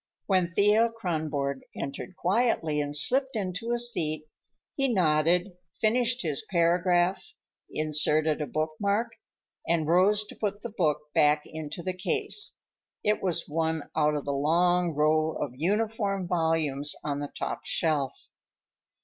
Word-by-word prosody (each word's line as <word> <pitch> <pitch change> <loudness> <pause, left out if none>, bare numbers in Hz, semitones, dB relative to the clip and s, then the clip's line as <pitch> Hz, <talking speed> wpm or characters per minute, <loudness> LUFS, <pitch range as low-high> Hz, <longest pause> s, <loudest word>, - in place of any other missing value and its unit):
When 185 -3 +2
Thea 210 +5 +4
Kronborg 155 -7 -2 0.2
entered 140 +6 -6
quietly 185 -7 +1
and 145 0 -2
slipped 265 - +3
into 200 +2 -3
a 240 - +1
seat, 165 -11 +1 0.5
he 275 -2 +1
nodded, 175 0 +2 0.3
finished 245 +2 +2
his 155 0 -1
paragraph, 175 +1 +2 0.5
inserted 155 0 +2
a 150 - -2
bookmark, 200 +9 -1 0.6
and 165 -2 +1
rose 195 +5 +3
to - - -12
put 205 -1 -3
the 235 -3 -6
book 150 -5 -1
back 150 0 +3
into 160 +2 -7
the 185 - -2
case. 410 - -2 0.5
It 210 0 +1
was 180 -3 -1
one 160 0 -2
out 150 -1 +2
of 145 - -3
the 140 - -1
long 170 +4 +2
row 155 +1 +2
of - - -4
uniform 200 - -1
volumes 160 -4 0
on 145 -1 -2
the 145 0 -4
top - - -3
shelf. 150 -5 -1
170 Hz, 135 wpm, -27 LUFS, 150-205 Hz, 0.6 s, Thea